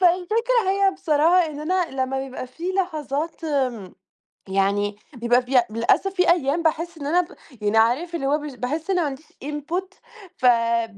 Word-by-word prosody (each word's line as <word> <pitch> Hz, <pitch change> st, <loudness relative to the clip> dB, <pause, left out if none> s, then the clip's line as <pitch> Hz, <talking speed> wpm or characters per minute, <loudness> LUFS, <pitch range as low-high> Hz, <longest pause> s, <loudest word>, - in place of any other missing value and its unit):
فالفكرة 425 Hz, +6 st, +2 dB
هي 395 Hz, 0 st, +3 dB
بصراحة 340 Hz, 0 st, +3 dB
إن 300 Hz, -2 st, -7 dB
أنا 330 Hz, -5 st, 0 dB
لمّا 265 Hz, +1 st, -2 dB
بيبقى 265 Hz, -1 st, -6 dB
فيه 335 Hz, +8 st, -5 dB
لحظات 320 Hz, -4 st, -2 dB
آمم، 255 Hz, -, -2 dB, 0.6 s
يعني 200 Hz, +1 st, +1 dB, 0.2 s
بيبقى 240 Hz, +1 st, +2 dB
فيها 250 Hz, -1 st, +3 dB
للأسف 230 Hz, -, +1 dB
في 360 Hz, -2 st, +2 dB
أيام 330 Hz, -1 st, +1 dB
باحس 330 Hz, +1 st, -1 dB
إن 285 Hz, -, -7 dB
أنا 345 Hz, +4 st, +3 dB
ب 345 Hz, -, -9 dB, 0.3 s
يعني 210 Hz, +1 st, +1 dB
عارف 260 Hz, +11 st, +2 dB
اللي 275 Hz, -, -2 dB
هو 290 Hz, +2 st, +3 dB
مش 295 Hz, -3 st, -7 dB
باحس 295 Hz, +8 st, -3 dB
إن 385 Hz, -, +2 dB
ما 360 Hz, -, +2 dB
عنديش 290 Hz, 0 st, -5 dB, 0.2 s
input، 330 Hz, +6 st, -4 dB, 0.4 s
فـب 230 Hz, -3 st, +2 dB
295 Hz, 170 wpm, -23 LUFS, 250-350 Hz, 0.6 s, هي